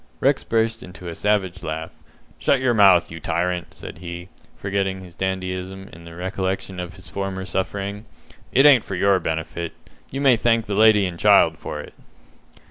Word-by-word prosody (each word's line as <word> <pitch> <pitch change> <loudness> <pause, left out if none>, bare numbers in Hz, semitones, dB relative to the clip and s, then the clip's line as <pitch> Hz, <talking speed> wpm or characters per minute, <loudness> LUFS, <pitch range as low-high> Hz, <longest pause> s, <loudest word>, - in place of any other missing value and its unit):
Rex - - +2
burst 115 0 0
into 90 -1 -9
a - - -5
savage 95 -1 0
laugh. 80 0 -4 0.5
"Shut 140 - +3
your 130 -2 +2
mouth, 95 -7 +5
you 80 - -7
tyrant," 85 +2 -2
said - - -10
he, 85 +1 -7 0.3
forgetting 95 -1 -2
his 90 -2 -13
dandyism 95 0 -4
in 85 +1 -12
the 85 0 -11
recollection 95 0 -3
of 90 0 -6
his 95 - -13
former 95 -1 -4
suffering. 100 +3 -3 0.5
"It 135 +3 +5
ain't 140 -6 +7
for 95 - -5
your 100 +1 +3
benefit. 80 +1 -3 0.4
You 135 - -5
may 135 -4 +5
thank 115 0 +2
the 105 - -4
lady 105 -1 +5
and 85 -2 -5
the - - -5
child - - +5
for - - -5
it." - - -12
95 Hz, 180 wpm, -22 LUFS, 90-105 Hz, 0.5 s, ain't